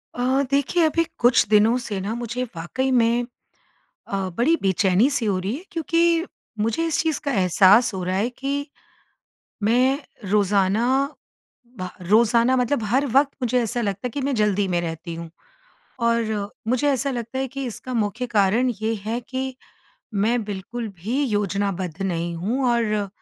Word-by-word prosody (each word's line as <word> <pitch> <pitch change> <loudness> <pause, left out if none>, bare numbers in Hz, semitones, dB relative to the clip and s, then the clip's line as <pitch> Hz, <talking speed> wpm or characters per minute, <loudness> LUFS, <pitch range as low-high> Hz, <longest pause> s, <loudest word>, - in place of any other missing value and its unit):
अ, 255 +2 +1
देखिए 285 +5 +2
अभी 330 +2 +2 0.2
कुछ 245 0 +5
दिनों 215 +3 +5
से 205 -5 -4
ना 200 +3 -3
मुझे 240 +1 -3
वाक़ई 260 +11 -2
में 240 -1 +3 0.9
अ, 195 -1 -1
बड़ी 305 +8 +3
बेचैनी-सी 200 +7 +2
हो 195 -3 +1
रही 190 +5 -2
है, 335 - -10
क्योंकि 335 +1 +1 0.3
मुझे 225 +10 0
इस 325 - 0
चीज़ 320 -2 -1
का 285 - 0
एहसास 195 +3 +5
हो 185 - -3
रहा 185 +1 -1
है 210 +5 +1
कि, 280 +3 -3 1.0
मैं 250 +6 +3 0.3
रोज़ाना 205 +1 +2 0.9
भ 185 - -3
रोज़ाना 230 +6 +4
मतलब 250 0 +1
हर 260 +7 +1
वक़्त 275 +3 +3
मुझे 250 +1 +2
ऐसा 235 +1 -2
लगता 205 +1 -2
है - - -2
कि 280 - -4
मैं 275 0 -1
जल्दी 205 -3 +1
में 175 -1 +1
रहती 165 0 -5
हूँ। 165 0 -7 0.8
और 220 -3 0 0.2
मुझे 255 +4 +1
ऐसा 275 0 0
लगता 240 +1 -4
है, 265 - -1
कि 270 +1 -5
इसका 255 +2 -6
मुख्य 225 +1 -1
कारण 220 +4 +2
ये 220 +1 0
है 230 +2 -1
कि, 260 +1 -4 0.6
मैं 225 +4 +1
बिल्कुल 210 +4 -5
भी 245 +9 0
योजनाबद्ध 200 - -2
नहीं 170 -2 -2
हूँ 225 +11 -1
और 215 -4 0
230 Hz, 160 wpm, -23 LUFS, 200-260 Hz, 1.0 s, कुछ